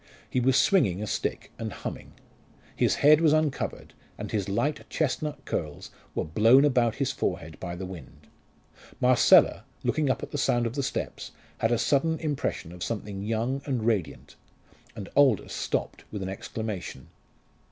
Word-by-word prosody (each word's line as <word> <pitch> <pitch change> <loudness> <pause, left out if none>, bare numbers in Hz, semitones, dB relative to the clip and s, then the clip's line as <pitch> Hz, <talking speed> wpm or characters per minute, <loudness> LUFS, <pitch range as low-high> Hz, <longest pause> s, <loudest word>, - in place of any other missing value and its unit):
He - - 0
was 130 +1 +3
swinging 105 - +3
a - - -2
stick - - -3
and 110 -1 -4
humming. - - -7 0.6
His - - +2
head 155 +2 +7
was 155 -2 +5
uncovered, 155 -3 -1 0.2
and - - -6
his 100 -3 -1
light 140 +9 -1
chestnut 150 -1 -2
curls 75 -3 -4 0.2
were - - -1
blown 115 - +5
about 125 -5 +2
his 135 -2 0
forehead 80 0 -3
by 85 -2 -5
the 95 +2 -5
wind. 90 -7 -11 0.7
Marcella, 125 -1 +5 0.2
looking 150 -3 +1
up - - 0
at - - -7
the 145 - -3
sound 120 -3 +2
of 115 - -2
the 140 - -1
steps, 130 - -4 0.3
had 115 - +1
a 120 - +3
sudden 145 +7 +2
impression 145 - -3
of 90 0 -7
something 105 -3 -4
young 115 +6 -1
and 125 -6 -1
radiant, 100 -11 -2 0.6
and 100 -4 -7
Aldous 135 -8 +3
stopped - - -3
with 105 -2 -4
an 95 - -4
exclamation. 100 - -6
115 Hz, 165 wpm, -27 LUFS, 100-140 Hz, 0.7 s, head